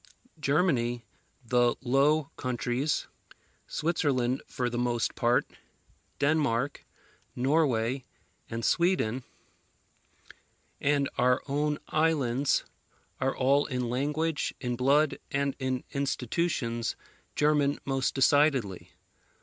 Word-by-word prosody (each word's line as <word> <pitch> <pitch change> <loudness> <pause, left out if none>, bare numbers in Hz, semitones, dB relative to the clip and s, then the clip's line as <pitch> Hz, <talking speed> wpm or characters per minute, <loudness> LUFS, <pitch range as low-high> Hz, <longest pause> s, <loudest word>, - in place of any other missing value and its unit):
Germany, 135 -6 +1 0.4
the 120 0 +3
Low 140 +3 +2
Countries, 125 +3 -1 0.6
Switzerland 135 -6 0
for 125 - -2
the 120 0 -2
most 120 -1 0
part, 120 +1 +2 0.7
Denmark, 140 -3 +1 0.5
Norway, 130 -2 +1 0.5
and 115 0 -3
Sweden, 170 -9 +2 1.6
and 145 -1 +2
our 125 0 +3
own 150 +1 0
islands, 145 -4 +1 0.5
are 130 +1 0
all 140 +2 +3
in 125 -3 -2
language, 150 +4 -1
in 125 -1 -2
blood, 140 +4 +2
and 140 0 -1
in 130 -1 -2
institutions, 130 -3 -1 0.4
German 150 -1 +2
most 135 -1 0
decidedly. 135 - +2
135 Hz, 90 wpm, -29 LUFS, 125-145 Hz, 1.6 s, the